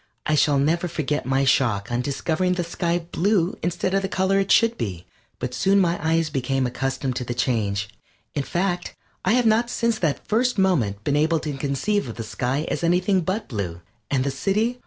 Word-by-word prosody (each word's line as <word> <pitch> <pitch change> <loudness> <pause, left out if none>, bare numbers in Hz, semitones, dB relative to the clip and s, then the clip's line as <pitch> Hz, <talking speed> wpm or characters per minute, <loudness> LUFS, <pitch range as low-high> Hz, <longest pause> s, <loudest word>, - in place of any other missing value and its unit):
I 155 - +1
shall 145 -1 +3
never 165 +6 +1
forget 150 -5 -2
my 135 +1 +2
shock 115 -6 +2
on 120 +1 0
discovering 160 +7 0
the 180 -1 -1
sky 170 0 -2
blue 195 +1 +1
instead 175 +2 -1
of 195 - +2
the 195 - -3
color 195 0 +2
it 195 0 0
should 230 0 +5
be, 90 - -4 0.3
but 125 0 -4
soon 195 +11 +3
my 175 -2 +2
eyes 160 -1 +1
became 135 -1 0
accustomed 130 +1 -2
to - - -2
the 120 0 -4
change. 105 -5 0 0.5
In 145 - 0
fact, 175 +4 -2 0.3
I 190 - +3
have 245 -1 +3
not 225 +2 +3
since 230 -2 0
that 155 -5 -1
first 245 +2 +1
moment 125 - +1
been 145 - +1
able 160 +2 +2
to 150 - -3
conceive 140 - -1
of 115 - -6
the 115 - -5
sky 130 +7 -2
as - - -2
anything 180 +3 +2
but 195 +6 -2
blue. 90 -8 -4 0.3
And 135 -2 +1
the 140 - -1
city? 210 - 0
160 Hz, 200 wpm, -23 LUFS, 130-190 Hz, 0.5 s, should